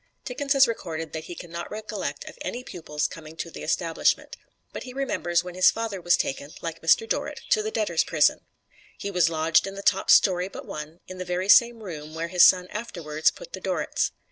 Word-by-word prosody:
Dickens 275 +3 -1
has 270 -2 +6
recorded 165 -8 -4
that 160 0 -5
he 175 - -7
can 170 - -10
not 170 0 -5
recollect 210 -9 -5
of - - -9
any 245 - -4
pupils 155 -8 -4
coming 160 -1 -7
to 165 +1 -5
the - - -9
Establishment. 165 0 0 0.4
But - - -5
he 255 - -8
remembers 175 -11 0
when 180 0 -7
his 185 +1 +6
father 225 -4 -3
was 175 0 +4
taken, 140 +1 -3
like 165 -1 -6
Mr. 165 +7 +4
Dorrit, - - -2
to 445 -3 +4
the 435 - -2
Debtors' - - +1
Prison. - - +3 0.6
He 200 - -4
was 180 -3 +3
lodged 160 +2 +2
in 195 - -6
the 200 - -7
top - - +2
story 180 -1 +5
but 195 - -9
one, 155 +3 -8
in 185 0 -9
the - - -2
very 180 +2 -2
same 235 0 +6
room 155 -4 -7
where 165 +1 -3
his 180 -1 +5
son 180 -1 +6
afterwards 165 -8 -1
put - - -12
the - - -6
Dorrits. - - -1
180 Hz, 215 wpm, -25 LUFS, 165-215 Hz, 0.6 s, has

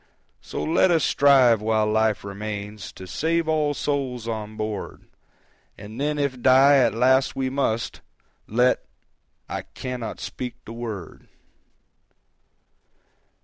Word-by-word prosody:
"So - - -5
let 165 +3 +3
us 165 -4 +3
strive, 130 -6 +5
while 110 0 +1
life 110 0 +1
remains, 105 0 -6
To 95 - -10
save 165 - -1
all 155 -2 +1
souls 130 -6 -2
on 110 -1 -5
board, 110 -2 -5 0.7
And 110 +5 -8
then 150 +1 0
if 140 -4 -2
die 135 +2 +6
at 125 -4 +3
last 130 +3 +3
we 130 -1 -1
must, 125 -5 -1 0.5
Let.... 125 +3 +2 0.6
I - - -4
cannot 125 -3 -6
speak 125 -1 -6
the 115 - -8
word!" 110 -7 -7
125 Hz, 120 wpm, -24 LUFS, 110-140 Hz, 0.7 s, die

